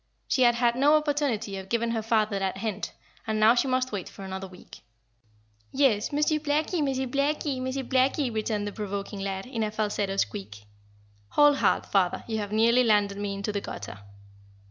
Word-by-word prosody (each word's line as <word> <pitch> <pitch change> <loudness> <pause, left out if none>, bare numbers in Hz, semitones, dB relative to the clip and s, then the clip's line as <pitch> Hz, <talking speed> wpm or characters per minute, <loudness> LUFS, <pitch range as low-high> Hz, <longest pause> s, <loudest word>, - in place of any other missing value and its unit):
She 260 - +1
had 240 -1 +5
had 235 0 +2
no 285 +4 +5
opportunity 285 -9 0
of 190 0 -8
giving 235 0 0
her 225 -1 -1
father 215 -2 +1
that 190 0 -2
hint, 210 0 -3 0.4
and 215 0 0
now 220 +2 +6
she 250 +2 +1
must 255 0 0
wait 200 -4 -4
for 195 - -11
another 190 0 -5
week. 180 -1 -14 0.9
"Yes, 260 -7 +2
Monsieur 300 +1 +1
Blackie 305 +3 0
Monsieur 265 -1 -1
Blackie 280 +1 -1
Monsieur 260 +1 -3
Blackie," 260 0 +1
returned 215 -1 -1
the 205 - -3
provoking 200 -1 -5
lad, 195 -1 -3
in 250 -3 -4
a 215 - 0
falsetto 210 -2 -2
squeak. 105 - -3 0.7
"Hold 295 -1 +5
hard, - - +2
father, 185 -3 +1
you 220 -1 -2
have 205 -1 -4
nearly 230 +3 +4
landed 205 -3 +2
me 200 -1 -3
into 200 +2 -3
the 200 -1 -2
gutter." 105 - -7
220 Hz, 185 wpm, -27 LUFS, 200-260 Hz, 0.9 s, now